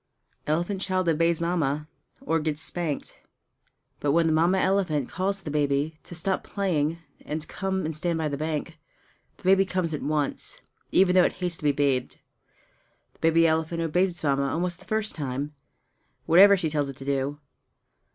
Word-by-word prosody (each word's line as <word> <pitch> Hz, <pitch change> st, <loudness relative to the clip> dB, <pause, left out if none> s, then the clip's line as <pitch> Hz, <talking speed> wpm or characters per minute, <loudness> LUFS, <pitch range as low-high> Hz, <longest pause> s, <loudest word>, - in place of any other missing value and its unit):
Elephant 175 Hz, +6 st, -1 dB
Child 185 Hz, -2 st, 0 dB
Obeys 165 Hz, +1 st, +2 dB
Mamma 155 Hz, -4 st, -1 dB, 0.3 s
or 165 Hz, +2 st, 0 dB
Gets 150 Hz, -1 st, -2 dB
Spanked 160 Hz, -2 st, -4 dB, 0.8 s
But 145 Hz, -1 st, +1 dB
when 165 Hz, +1 st, +3 dB
the 160 Hz, -, +2 dB
Mamma 170 Hz, +4 st, +3 dB
elephant 185 Hz, -8 st, +1 dB
calls 195 Hz, +2 st, -1 dB
to 195 Hz, -, -12 dB
the 150 Hz, -, -3 dB
baby 145 Hz, +1 st, 0 dB
to 175 Hz, -, -9 dB
stop 185 Hz, +3 st, -1 dB
playing 165 Hz, -6 st, -1 dB, 0.3 s
and 155 Hz, +1 st, -3 dB
come 190 Hz, -2 st, -2 dB
and 160 Hz, 0 st, -3 dB
stand 170 Hz, +2 st, -1 dB
by 160 Hz, -1 st, -1 dB
the 145 Hz, -, -2 dB
bank, 155 Hz, +1 st, -4 dB, 0.6 s
the -, -, -21 dB
baby 195 Hz, +1 st, +5 dB
comes 185 Hz, -4 st, -2 dB
at 150 Hz, -, -3 dB
once, 150 Hz, -1 st, 0 dB, 0.3 s
even 185 Hz, -1 st, +4 dB
though 185 Hz, -1 st, +6 dB
it -, -, 0 dB
hates 180 Hz, -2 st, -2 dB
to -, -, -13 dB
be 145 Hz, -, +4 dB
bathed. 140 Hz, -3 st, 0 dB, 1.0 s
The -, -, -29 dB
baby 165 Hz, +1 st, +4 dB
elephant 160 Hz, +1 st, +1 dB
obeys 180 Hz, +4 st, +2 dB
its 175 Hz, -2 st, -7 dB
Mamma 140 Hz, -1 st, +1 dB
almost 175 Hz, +1 st, -2 dB
the -, -, -17 dB
first 215 Hz, -1 st, -1 dB
time, 140 Hz, 0 st, -4 dB, 0.7 s
whatever 195 Hz, +5 st, +7 dB
she 160 Hz, -4 st, -2 dB
tells 145 Hz, -2 st, 0 dB
it 135 Hz, -, -7 dB
to 135 Hz, -, -9 dB
do. 140 Hz, +1 st, -1 dB
160 Hz, 180 wpm, -26 LUFS, 150-180 Hz, 1.0 s, whatever